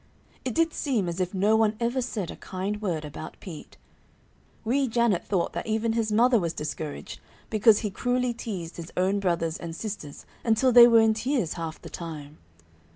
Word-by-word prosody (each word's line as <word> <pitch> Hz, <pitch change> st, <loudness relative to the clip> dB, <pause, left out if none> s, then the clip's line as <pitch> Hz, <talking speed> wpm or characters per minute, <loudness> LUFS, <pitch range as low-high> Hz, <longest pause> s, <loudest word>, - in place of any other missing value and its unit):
It 250 Hz, -, -3 dB
did 330 Hz, -1 st, +2 dB
seem 240 Hz, -, 0 dB
as 170 Hz, +1 st, -3 dB
if 180 Hz, -1 st, -1 dB
no 205 Hz, +4 st, +3 dB
one 220 Hz, -1 st, +2 dB
ever 240 Hz, +2 st, 0 dB
said 215 Hz, -8 st, -3 dB
a -, -, -8 dB
kind 195 Hz, +3 st, -4 dB
word 170 Hz, -7 st, -2 dB
about 150 Hz, +1 st, -8 dB
Pete. 165 Hz, -6 st, -10 dB, 0.9 s
Wee 265 Hz, +4 st, +2 dB
Janet 235 Hz, -5 st, +1 dB
thought 185 Hz, -4 st, -1 dB
that -, -, -4 dB
even 220 Hz, +1 st, 0 dB
his 225 Hz, -2 st, 0 dB
mother 235 Hz, +2 st, +4 dB
was 170 Hz, -3 st, -2 dB
discouraged, 150 Hz, 0 st, -5 dB, 0.3 s
because 215 Hz, -1 st, +5 dB
he 210 Hz, -3 st, -2 dB
cruelly 245 Hz, +4 st, 0 dB
teased 195 Hz, -8 st, -6 dB
his 170 Hz, -1 st, -8 dB
own 190 Hz, +2 st, +2 dB
brothers 170 Hz, -3 st, 0 dB
and 165 Hz, -2 st, -7 dB
sisters 195 Hz, -8 st, -7 dB, 0.2 s
until 235 Hz, +3 st, +3 dB
they 240 Hz, 0 st, +10 dB
were 230 Hz, -1 st, +6 dB
in 220 Hz, 0 st, +4 dB
tears 225 Hz, -, -1 dB
half 165 Hz, -2 st, -5 dB
the -, -, -10 dB
time. 155 Hz, -3 st, -8 dB
210 Hz, 185 wpm, -26 LUFS, 170-235 Hz, 0.9 s, they